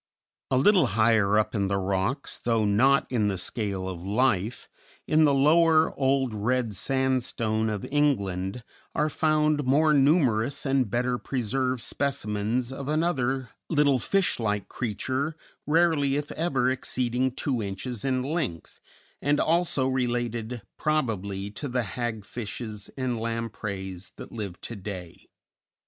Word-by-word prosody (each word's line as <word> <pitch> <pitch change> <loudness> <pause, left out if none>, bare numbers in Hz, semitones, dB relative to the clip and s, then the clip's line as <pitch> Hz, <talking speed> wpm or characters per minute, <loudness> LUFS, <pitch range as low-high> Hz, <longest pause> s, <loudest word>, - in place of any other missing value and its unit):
A 130 - +2
little 180 +2 +5
higher 110 -2 +4
up 110 - +1
in 100 -3 0
the 100 0 0
rocks, 95 +7 -2
though 115 -2 +2
not 130 +9 +4
in 110 -5 +2
the 100 -2 -1
scale 100 -1 -2
of 90 -3 -5
life, 105 +2 0 0.4
in 155 0 +4
the 145 - +4
Lower 160 +3 +4
Old 135 -3 +1
Red 115 +2 0
Sandstone 120 -3 0
of 105 -3 -3
England, 105 -8 0 0.3
are 150 +1 +2
found 155 -1 +2
more 150 +4 +4
numerous 140 -4 +3
and 135 -4 +2
better 125 +2 0
preserved 130 0 -1
specimens 120 -2 -1
of 135 0 -6
another 135 -5 0 0.2
little 145 -4 +3
fish 195 - +1
like 105 -3 -1
creature, 130 +6 -2 0.3
rarely 155 -3 +3
if 145 0 -3
ever 140 -6 0
exceeding 130 0 -1
two 130 -1 -2
inches 105 +3 -5
in 130 -1 0
length, 135 - -3 0.4
and 145 +1 +2
also 165 -5 +2
related 120 -3 -2 0.2
(probably) 100 -10 -1
to 145 +7 -5
the 125 -1 0
hag 110 -1 -4
fishes 110 -2 -6
and 125 -3 -1
lampreys 105 -5 -4
that - - -10
live 100 -6 -6
to 115 - -6
day. 95 -4 -8
125 Hz, 135 wpm, -27 LUFS, 105-140 Hz, 0.4 s, little